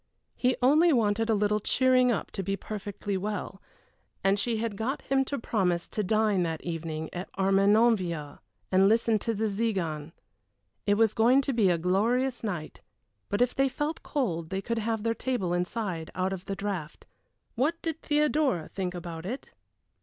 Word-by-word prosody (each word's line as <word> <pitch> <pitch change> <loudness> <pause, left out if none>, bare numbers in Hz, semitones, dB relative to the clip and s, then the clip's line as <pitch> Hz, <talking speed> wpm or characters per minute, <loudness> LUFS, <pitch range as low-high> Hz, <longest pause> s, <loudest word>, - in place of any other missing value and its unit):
He 255 0 +2
only 310 +6 +5
wanted 225 -3 +2
a 220 - +4
little 210 +1 +2
cheering 255 +3 +3
up 225 - -2
to - - -3
be 195 +1 -1
perfectly 205 -1 -4
well, 200 0 -4 0.6
and 195 +1 +3
she 230 +2 0
had 220 -2 -2
got 240 +7 -3
him 270 0 +2
to 280 - -3
promise 180 -7 0
to 215 - -2
dine 215 -1 +2
that 165 -2 -2
evening 160 -2 -4
at 180 +1 -5
Armenonville 195 -5 +2 0.3
and 190 +1 +5
listen 225 0 +3
to 230 +2 -2
the 220 +2 0
Tziganes. 190 -8 -2 0.7
It 205 - +4
was 220 0 +3
going 245 +5 +5
to 275 - -1
be 215 -5 +3
a 175 - +3
glorious 230 +10 +1
night, 175 -8 -4 0.5
but 205 +4 +3
if 250 - -1
they 270 0 +2
felt 295 +4 -3
cold 170 - -2
they 190 - -2
could 230 +3 -2
have 225 -1 -2
their 230 0 +1
table 230 -8 -1
inside 180 -2 -2
out 185 +1 0
of 190 -1 -7
the 195 - -3
draught. 195 -6 -5 0.5
What 300 +8 0
did 325 -1 -3
Theodora 295 - +1
think 185 -2 -3
about 170 -1 -6
it? 250 +6 -6
210 Hz, 175 wpm, -28 LUFS, 185-235 Hz, 0.7 s, only